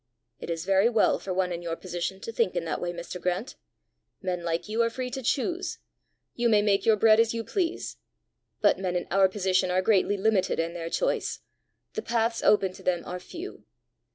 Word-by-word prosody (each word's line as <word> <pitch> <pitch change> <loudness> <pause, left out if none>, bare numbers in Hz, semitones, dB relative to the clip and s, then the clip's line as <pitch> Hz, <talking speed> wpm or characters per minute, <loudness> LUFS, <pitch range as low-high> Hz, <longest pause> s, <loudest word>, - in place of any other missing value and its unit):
"It - - -7
is 165 0 -3
very 195 +3 +4
well 225 -3 +3
for 195 - -5
one 180 0 0
in 170 0 -4
your 170 -1 -3
position 175 +2 -4
to 230 - -5
think 225 -5 0
in 175 -1 -1
that 160 - -3
way, 175 - -1
Mr. 175 +1 -7
Grant! 180 +6 -2 0.6
Men 180 -2 -3
like 165 +2 -2
you 220 +2 0
are 230 - +3
free 250 +2 -4
to 265 +1 -4
choose; 340 +9 -1 0.6
you 240 0 +1
may 210 -2 +4
make 200 0 +2
your 220 - +6
bread 215 +1 +5
as 230 0 +3
you 230 - -2
please. 355 - -2 0.6
But - - +4
men 185 -2 -2
in 175 - -1
our 190 0 +5
position 185 -1 +1
are 185 +1 +1
greatly 205 -1 +3
limited 200 -3 +1
in 165 +1 -1
their 165 -1 -5
choice; - - -1 0.5
the 440 - -3
paths 230 - 0
open 195 -3 +3
to - - -13
them 175 -2 0
are 180 0 -5
few. 345 - -9
195 Hz, 210 wpm, -27 LUFS, 180-230 Hz, 0.6 s, your